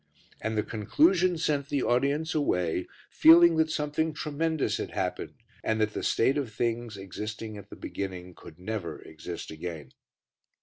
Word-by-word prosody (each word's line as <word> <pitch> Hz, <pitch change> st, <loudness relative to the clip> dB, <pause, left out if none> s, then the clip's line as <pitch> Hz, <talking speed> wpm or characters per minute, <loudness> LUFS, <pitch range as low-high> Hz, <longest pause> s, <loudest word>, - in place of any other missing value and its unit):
And 110 Hz, -1 st, -2 dB
the 105 Hz, -, +2 dB
conclusion 170 Hz, -, +2 dB
sent 145 Hz, -3 st, 0 dB
the 140 Hz, -3 st, 0 dB
audience 140 Hz, +6 st, +1 dB
away 90 Hz, -, 0 dB, 0.2 s
feeling 165 Hz, +1 st, +7 dB
that 160 Hz, 0 st, +3 dB
something 155 Hz, +1 st, -1 dB
tremendous 155 Hz, +1 st, -1 dB
had -, -, -4 dB
happened, -, -, -3 dB, 0.3 s
and 110 Hz, 0 st, 0 dB
that 105 Hz, 0 st, +1 dB
the -, -, -3 dB
state 135 Hz, +5 st, +2 dB
of 130 Hz, -6 st, -4 dB
things 115 Hz, 0 st, -2 dB
existing 105 Hz, +3 st, -6 dB
at 100 Hz, -, -11 dB
the -, -, -9 dB
beginning 90 Hz, -2 st, -6 dB
could 80 Hz, -1 st, -13 dB
never 95 Hz, -1 st, -4 dB
exist 80 Hz, -, -7 dB
again. 80 Hz, -4 st, -7 dB
115 Hz, 150 wpm, -28 LUFS, 100-155 Hz, 0.3 s, feeling